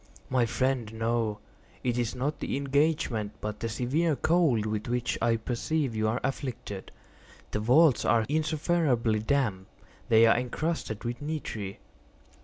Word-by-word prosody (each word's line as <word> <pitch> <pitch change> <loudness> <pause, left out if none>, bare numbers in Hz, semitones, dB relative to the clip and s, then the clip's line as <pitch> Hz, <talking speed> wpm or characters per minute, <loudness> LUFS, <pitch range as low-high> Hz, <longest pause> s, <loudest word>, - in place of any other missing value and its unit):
"My 125 -2 +3
friend, 120 0 0
no. 115 -1 0 0.5
It 125 -2 0
is 120 -1 -1
not 140 +5 -2
the - - -2
engagement, 140 -6 0
but 105 0 -5
the 115 - -2
severe 140 +8 +1
cold 155 -10 +2
with 105 0 -2
which 120 0 -1
I 115 - +3
perceive 125 +4 -1
you 110 0 +1
are 115 +3 0
afflicted. 125 -7 -4 0.6
The - - -1
vaults 130 +5 +5
are 115 0 +3
insufferably 150 -6 +1
damp. 110 -5 0 0.4
They 115 0 +7
are 115 - +5
encrusted 125 -3 -3
with 120 +2 -4
nitre." 125 -10 -4
120 Hz, 140 wpm, -28 LUFS, 110-140 Hz, 0.6 s, They